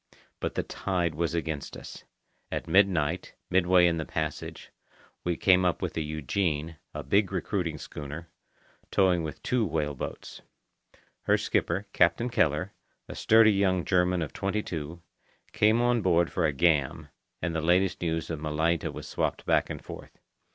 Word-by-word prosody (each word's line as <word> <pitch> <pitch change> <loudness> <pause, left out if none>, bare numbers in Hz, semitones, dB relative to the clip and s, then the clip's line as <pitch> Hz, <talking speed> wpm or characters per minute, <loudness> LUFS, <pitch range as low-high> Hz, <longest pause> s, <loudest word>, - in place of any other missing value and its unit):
But - - -3
the - - 0
tide 90 -4 -2
was 85 +2 -1
against 80 -3 -3
us. - - -10 0.5
At - - -3
midnight, 90 -4 +2 0.2
midway 90 0 +5
in 85 -1 +2
the 80 - -2
passage, 80 -2 -5 0.5
we 85 -1 -1
came 95 -1 +4
up 90 -2 +1
with - - -3
the 80 - -2
Eugenie, 80 +1 -2
a 75 - -6
big 100 +9 +2
recruiting 90 -4 -2
schooner, 75 +3 -7 0.6
towing 90 -3 +3
with 80 -2 -6
two 125 -2 +1
whale 75 -6 -1
boats. 65 - -7 0.8
Her - - +4
skipper, 95 +5 0
Captain 85 +9 +3
Keller, 85 +2 +1 0.3
a - - -7
sturdy 110 0 +5
young 95 -3 +1
German 90 -2 +2
of 75 - -7
twenty 100 +2 -1
two, 80 +1 -6 0.5
came 110 +2 +3
on 120 -1 +2
board 85 -3 +2
for 85 -4 +1
a - - +1
"gam," 75 -2 +1 0.3
and 85 -1 -2
the 80 - -1
latest 90 +3 +2
news 80 -1 -2
of 80 - -3
Malaita 80 +2 0
was - - -8
swapped - - -2
back - - +2
and - - -7
forth. - - -10
85 Hz, 160 wpm, -28 LUFS, 80-95 Hz, 0.8 s, midway